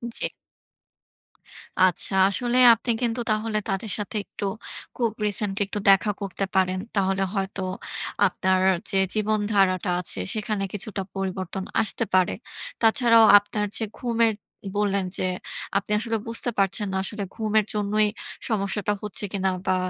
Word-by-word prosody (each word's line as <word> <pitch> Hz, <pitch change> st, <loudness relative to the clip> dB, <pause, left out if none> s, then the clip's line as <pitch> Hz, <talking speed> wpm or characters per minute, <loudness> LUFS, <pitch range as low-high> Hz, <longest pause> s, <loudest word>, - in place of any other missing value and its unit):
জ্বি। -, -, 0 dB, 1.6 s
আচ্ছা। 185 Hz, +1 st, +2 dB, 0.2 s
আসলে 245 Hz, +4 st, 0 dB, 0.2 s
আপনি 235 Hz, +1 st, -1 dB
কিন্তু 240 Hz, 0 st, 0 dB
তাহলে 215 Hz, 0 st, 0 dB
তাদের 195 Hz, +1 st, -2 dB
সাথে 205 Hz, +1 st, -5 dB
একটু 200 Hz, -, -6 dB, 0.5 s
খুব 230 Hz, -3 st, 0 dB
রিসেন্টলি 205 Hz, 0 st, -1 dB
একটু 205 Hz, -, -4 dB
দেখা 195 Hz, +2 st, +5 dB
করতে 195 Hz, 0 st, -2 dB
পারেন। 185 Hz, 0 st, +2 dB, 0.2 s
তাহলে 195 Hz, 0 st, +1 dB
হয়তো 195 Hz, -1 st, -3 dB, 0.7 s
আপনার 185 Hz, 0 st, +1 dB, 0.3 s
যে 195 Hz, -, +1 dB, 0.2 s
জীবনধারাটা 205 Hz, -3 st, +1 dB
আছে, 180 Hz, -, -6 dB
সেখানে 215 Hz, -2 st, -2 dB
কিছুটা 205 Hz, 0 st, -4 dB
পরিবর্তন 190 Hz, 0 st, -3 dB, 0.2 s
আসতে 225 Hz, +1 st, -2 dB
পারে। 185 Hz, -1 st, +4 dB, 0.5 s
তাছাড়াও 230 Hz, -1 st, +6 dB
আপনার 210 Hz, +1 st, -1 dB
যে 225 Hz, -, -2 dB
ঘুমের 230 Hz, -2 st, +1 dB, 0.4 s
বললেন 200 Hz, -2 st, +1 dB
যে, 185 Hz, -, 0 dB, 0.5 s
আপনি 200 Hz, +1 st, -3 dB
আসলে 225 Hz, -1 st, -1 dB
বুঝতে 230 Hz, +1 st, -1 dB
পারছেন 195 Hz, +1 st, +1 dB
না -, -, 0 dB
আসলে 205 Hz, 0 st, -4 dB
ঘুমের 215 Hz, -1 st, +1 dB
জন্যই 210 Hz, +1 st, +1 dB, 0.4 s
সমস্যাটা 205 Hz, -1 st, 0 dB
হচ্ছে 210 Hz, 0 st, -4 dB
কিনা 190 Hz, -1 st, +1 dB, 0.2 s
বা, 185 Hz, -, +3 dB
205 Hz, 135 wpm, -25 LUFS, 195-220 Hz, 1.6 s, তাছাড়াও